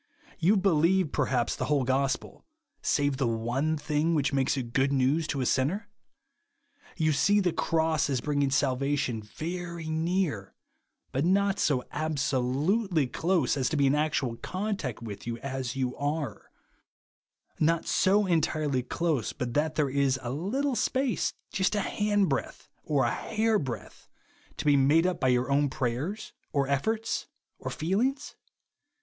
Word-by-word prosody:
You 190 +5 +4
be 195 +1 +3
lieve 170 +1 +3
perhaps 130 -4 0
the - - -2
whole 145 -3 +2
gospel, 135 +1 -1 0.4
save 145 -2 +1
the 135 -3 +1
one 120 +7 0
thing 150 +2 0
which 140 -2 +1
maks 135 0 +1
it 120 -3 -4
good 135 +1 +2
news 140 +4 +2
to 140 -3 -2
a - - 0
sinner? 155 - 0 1.1
You 155 -2 +2
see 190 +8 +3
the 180 -4 +1
cross 160 -2 +1
as 135 -3 +1
brino^insf 145 +1 0
sal 135 -1 +2
vation 135 -5 -1
very 170 +6 -5
near; 160 - -1 0.6
but 135 - 0
not 195 +3 +2
so 130 -4 +2
absolutely 150 - 0
close 160 +3 +1
as 130 -3 0
to 155 - -1
be 140 - +3
in 135 - +4
actual 145 -5 0
contact 185 - -4
with 105 0 -7
you 115 -1 -3
as 130 -1 -4
you 130 -2 -1
are; 145 -6 -3 1.1
not 165 +1 +2
so 200 +2 +3
entirely 155 -6 +1
close 145 -2 -1
but 120 -2 -4
that 155 +3 0
there 150 -2 +2
is 135 -1 +1
a 120 - -3
little 245 - -1
space, 260 +2 0 0.2
just 195 +2 +1
a 205 - +1
handbreadth 205 -9 -1
or 145 -3 +1
a 120 - +1
hairbreadth, 215 - -2 0.5
to - - -5
be 145 -1 +5
made 145 +5 +4
up 180 -1 0
by 130 - +1
your 125 +1 +2
own 145 0 +3
prayers, 145 - -3 0.2
or 140 -2 +1
efforts, 220 +12 -1 0.3
or - - -4
feelings 225 - -1
150 Hz, 155 wpm, -28 LUFS, 130-175 Hz, 1.1 s, be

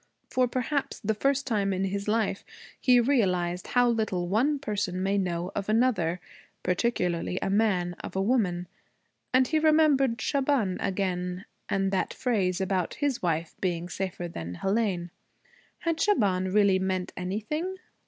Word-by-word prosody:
For 255 -1 +3
perhaps 260 +3 -2
the 220 -1 0
first 275 +5 +1
time 205 -5 0
in 190 0 -1
his 200 +1 -2
life 215 -2 0 0.4
he 250 -2 +5
realized 185 -9 +1
how 245 -2 +3
little 215 -7 0
one 250 +11 +2
person 200 -7 -2
may 200 +1 +1
know 180 -1 -2
of 200 0 -3
another, 215 -7 +2 0.4
particularly 180 -3 0
a 195 - -1
man 195 -4 +2
of - - -7
a 190 - +1
woman. 190 -7 +1 0.6
And 255 0 +4
he 315 - +2
remembered 300 -6 +4
Shaban 265 -8 +1
again, 180 -1 -2 0.2
and 195 0 +1
that 190 - -1
phrase 195 -7 0
about 190 -2 -1
his 285 -4 -1
wife 165 -2 -1
being 175 -2 -1
safer 185 -1 -4
than 90 - -6
Hélène. 195 - -1 0.7
Had 330 -1 -1
Shaban 190 - +2
really 200 -2 +4
meant 185 -1 -2
anything? 220 - -3
200 Hz, 145 wpm, -27 LUFS, 180-245 Hz, 0.7 s, he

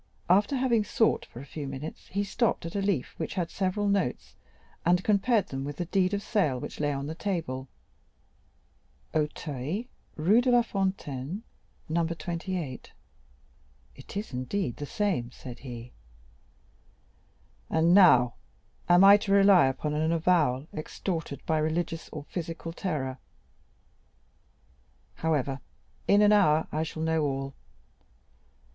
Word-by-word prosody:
After 205 +8 +4
having 250 -4 +2
sought 220 +2 +1
for 120 - -10
a - - -10
few 145 0 -6
minutes, 135 +4 -7
he 200 +2 -1
stopped 210 -1 0
at 165 - -6
a 200 - 0
leaf 195 -10 -1
which 160 - -4
had 175 -3 -2
several 195 +2 -1
notes, 125 - -1 0.5
and 180 +2 +3
compared 210 +1 +2
them 135 0 -4
with 145 +1 -5
the 175 - -2
deed 190 +2 +1
of 200 - -4
sale, 155 - +1
which - - -7
lay 145 -1 +1
on 140 0 -3
the 155 - -4
table, 160 -8 -3 1.5
and 155 - +3
recalling 150 - -1
his - - -9
souvenirs— 150 - -3 0.3
"'Auteuil, 155 - -5
Rue 215 +7 +6
de 255 - +1
la 245 -1 +6
Fontaine, 190 - -3 0.4
No. 165 +1 +1
28;' 170 -3 -4 1.0
it - - -9
is 205 - -5
indeed 130 - -2
the 145 - -5
same," 195 - -1
said 125 -1 -10
he; 120 -2 -8 1.8
"and 165 +2 +3
now, 125 -11 +7 0.6
am 175 +2 +7
I 200 +1 +9
to 205 -1 -4
rely 195 -5 +6
upon 135 +3 -2
an 155 +2 +1
avowal 155 -6 +2
extorted 160 -1 -4
by 160 -1 +1
religious 165 +1 -2
or 150 - -7
physical 165 +1 -5
terror? 140 -8 -3 1.9
However, 140 -4 -1 0.5
in 205 +1 +5
an 210 - +6
hour 160 -7 +4
I 155 - -1
shall 160 0 -4
know 160 0 +1
all. 135 -1 -2
165 Hz, 145 wpm, -28 LUFS, 140-195 Hz, 1.9 s, I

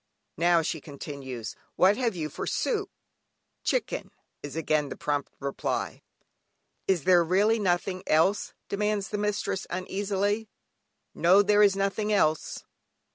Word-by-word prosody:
"Now," 170 0 +4
she 155 0 -3
continues, 140 -5 -7 0.2
"what 190 +3 +5
have 235 -4 0
you 160 -3 -2
for 150 - -6
soup?" 420 -5 -1 0.7
"Chicken" - - -1 0.3
is 145 -1 -7
again 155 -2 0
the - - -5
prompt 145 -1 -2
reply. 140 0 -3 0.9
"Is 185 -6 +2
there 180 -2 +5
really 205 +6 +3
nothing 185 -1 0
else?" 165 +6 +2
demands 210 0 -1
the 210 - -2
mistress 205 -2 -1
uneasily. 200 +3 -1 0.6
"No, 185 +4 +5
there 205 +1 +4
is 200 -2 +5
nothing 200 +2 0
else." 155 -7 +1
190 Hz, 130 wpm, -27 LUFS, 155-205 Hz, 0.9 s, what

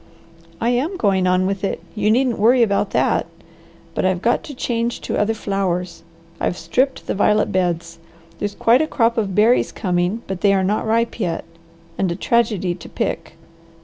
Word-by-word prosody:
"I 230 - +1
am 280 +10 0
going 190 - +2
on 185 0 +2
with 195 0 -2
it; 195 - -1
you 210 -1 0
needn't 245 +1 +2
worry 240 +3 +5
about 200 -2 +1
that. - - +1 0.7
But - - -1
I've 185 -1 0
got 235 - +2
to 290 -4 -8
change 235 -1 -2
to - - -3
other 220 +2 +1
flowers. 185 -5 -2 0.4
I've 180 - -1
stripped 255 +12 0
the - - -2
violet 210 +1 +2
beds. 170 -2 -1 0.4
There's 205 0 -3
quite 240 +4 +4
a 310 - 0
crop 230 -5 +1
of 200 -5 -1
berries 220 +4 +3
coming, 180 +3 -1
but 190 -1 -5
they 200 -1 +4
are 190 - +1
not 210 +3 0
ripe 230 +2 0
yet, 175 -6 -2 0.5
and 190 -3 +1
a - - -2
tragedy 210 -4 +1
to 175 - -11
pick. 165 - -3
205 Hz, 180 wpm, -20 LUFS, 185-230 Hz, 0.7 s, worry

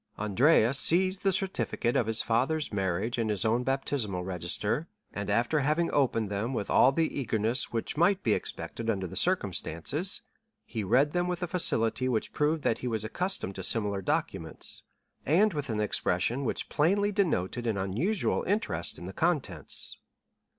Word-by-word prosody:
Andrea 115 +4 +3
seized 185 +6 +3
the 195 - +2
certificate 185 -9 -1
of 115 - +2
his 110 0 +1
father's 135 +5 0
marriage 100 +4 -1
and 110 -1 0
his 105 -2 0
own 115 +2 +2
baptismal 130 -8 -1
register, 95 - 0 0.3
and 100 0 -4
after 120 +9 +2
having 155 +4 +1
opened 115 -7 +1
them 110 +6 -2
with 100 - -3
all 130 - +6
the 160 0 -1
eagerness 115 0 -1
which 115 +5 -2
might 190 +4 +3
be 110 - +3
expected 115 +2 -4
under 95 -4 0
the 90 - -7
circumstances, 150 - 0 0.4
he 110 -3 -4
read 130 +9 +3
them 175 +1 0
with 180 0 -3
a - - -1
facility 130 -8 +1
which 115 -3 -1
proved 150 +1 0
that 115 - +1
he 125 - -4
was 110 -3 -2
accustomed 175 - -2
to 95 - -7
similar 100 -1 0
documents, - - -3 0.4
and 190 +8 +3
with 145 -3 -4
an 110 -2 -1
expression 105 +5 0
which - - -2
plainly 200 +7 +2
denoted 120 - 0
an 110 -3 0
unusual 110 - 0
interest 90 - -1
in - - -9
the 95 - -7
contents. 140 - -2
120 Hz, 165 wpm, -29 LUFS, 105-160 Hz, 0.4 s, all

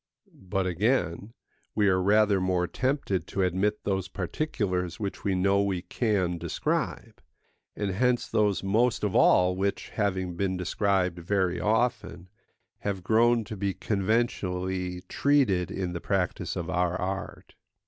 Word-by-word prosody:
But 95 0 -3
again, 100 +1 0 0.4
we 105 -1 +3
are 95 -1 +3
rather 100 0 +3
more 90 -1 +1
tempted 125 - -1
to 95 - -1
admit 95 +4 0
those 95 -2 -1
particulars 90 - -2
which 100 -2 -4
we 95 -2 +1
know 100 +2 +3
we 95 -3 -1
can 95 -8 0
describe; - - -3 0.5
and 100 -2 -2
hence 125 +5 +1
those 105 -3 +1
most 110 +4 +1
of 105 -3 0
all 90 0 +5
which, 100 +1 -2
having 95 -4 -1
been 95 0 -1
described 90 -1 0
very 90 0 0
often, 110 -4 -1 0.5
have 100 -3 -3
grown 115 +3 +3
to 110 - -7
be 100 -1 -2
conventionally 95 -4 -1
treated 100 -8 +2
in 95 -2 -3
the 85 - -5
practice 95 -3 -1
of - - -3
our 90 0 0
art. 95 +1 -5
95 Hz, 140 wpm, -27 LUFS, 90-105 Hz, 0.5 s, all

